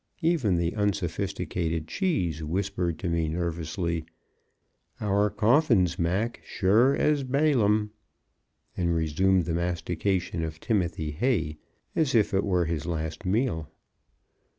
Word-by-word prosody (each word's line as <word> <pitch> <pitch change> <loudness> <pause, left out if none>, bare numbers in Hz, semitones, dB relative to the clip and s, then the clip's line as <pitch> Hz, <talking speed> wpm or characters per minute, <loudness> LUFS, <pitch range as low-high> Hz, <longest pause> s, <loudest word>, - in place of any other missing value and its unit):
Even 145 - +2
the 85 0 0
unsophisticated 90 -4 -2
Cheese, 90 - -1
whispered 90 0 -1
to 95 - -4
me 85 -2 0
nervously, 85 0 -2 1.0
"Our 105 0 +2
coffins, 110 - +3
Mac, 95 +8 -1
sure 110 +8 +3
as 150 -2 +2
Balaam!" 125 -7 +2 0.8
and 85 -2 0
resumed 85 +3 +2
the 85 - -2
mastication 85 +1 -1
of 80 -1 -5
timothy 85 -8 -1
hay, 80 - 0 0.4
as 150 -6 +1
if 110 -3 +3
it 95 - +2
were 90 -3 +1
his 80 -2 -3
last 80 +1 -3
meal. 95 - 0
90 Hz, 115 wpm, -27 LUFS, 85-105 Hz, 1.0 s, coffins